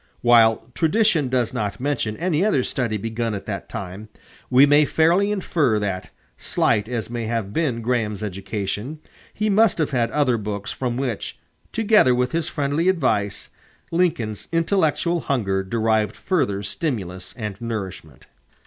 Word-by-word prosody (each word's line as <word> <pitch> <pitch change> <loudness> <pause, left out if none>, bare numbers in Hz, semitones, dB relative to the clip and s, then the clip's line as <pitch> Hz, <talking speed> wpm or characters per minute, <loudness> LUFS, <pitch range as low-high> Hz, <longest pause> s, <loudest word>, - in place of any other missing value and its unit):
While 115 0 +4
tradition 165 - +2
does 125 -3 0
not 105 -1 -3
mention 125 -6 -1
any 170 -1 +1
other 145 -12 +2
study 120 -5 -1
begun 115 +1 -2
at 100 - -7
that - - -5
time, 100 +3 -7 0.4
we 130 +2 +7
may 145 +1 +5
fairly 170 +7 +3
infer 160 - +1
that, 95 -3 -3 0.3
slight 105 +2 +1
as 115 -2 -3
may 120 -2 -3
have 110 -3 -2
been 130 -8 -1
Graham's 110 -4 -1
education, 105 - -4 0.3
he 215 - -2
must 215 0 +4
have 155 -3 0
had 120 -3 +1
other 135 -5 +2
books 105 0 -4
from 125 -2 -3
which, 125 -5 -3 0.3
together 210 - +4
with 125 0 0
his 165 -1 -1
friendly 145 +5 0
advice, 105 - 0 0.4
Lincoln's 155 - 0
intellectual 170 0 +1
hunger 105 -10 0
derived 110 +1 0
further 100 - -1
stimulus 100 - -4
and 105 -3 -5
nourishment. 95 - -6
120 Hz, 145 wpm, -22 LUFS, 105-155 Hz, 0.4 s, we